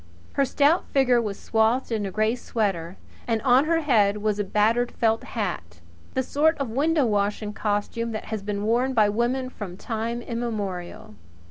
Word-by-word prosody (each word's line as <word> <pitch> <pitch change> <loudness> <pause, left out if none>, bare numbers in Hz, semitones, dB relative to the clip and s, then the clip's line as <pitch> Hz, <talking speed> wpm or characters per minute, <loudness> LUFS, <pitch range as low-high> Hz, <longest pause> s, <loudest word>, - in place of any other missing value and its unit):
Her 275 - +2
stout 290 +6 +2
figure 255 -3 +3
was 210 -3 -4
swathed 225 +3 +1
in 210 -3 -1
a - - -5
grey 215 +3 +1
sweater 195 -8 -2 0.3
and 225 -2 +1
on 260 +2 +5
her 330 +1 +2
head 210 -8 +3
was 210 0 -1
a - - +2
battered 220 +5 +1
felt 225 -1 +1
hat 130 - -4 0.4
the 260 - +1
sort 310 +5 +2
of 275 -4 -3
window 295 +3 +2
washing 210 0 -1
costume 215 +2 -2
that 215 - -5
has 215 - -2
been 205 0 -3
worn 245 +4 +1
by 215 -2 +5
women 240 +4 0
from 185 -6 -7
time 230 +2 -3
immemorial. 210 - -4
225 Hz, 170 wpm, -25 LUFS, 205-250 Hz, 0.4 s, on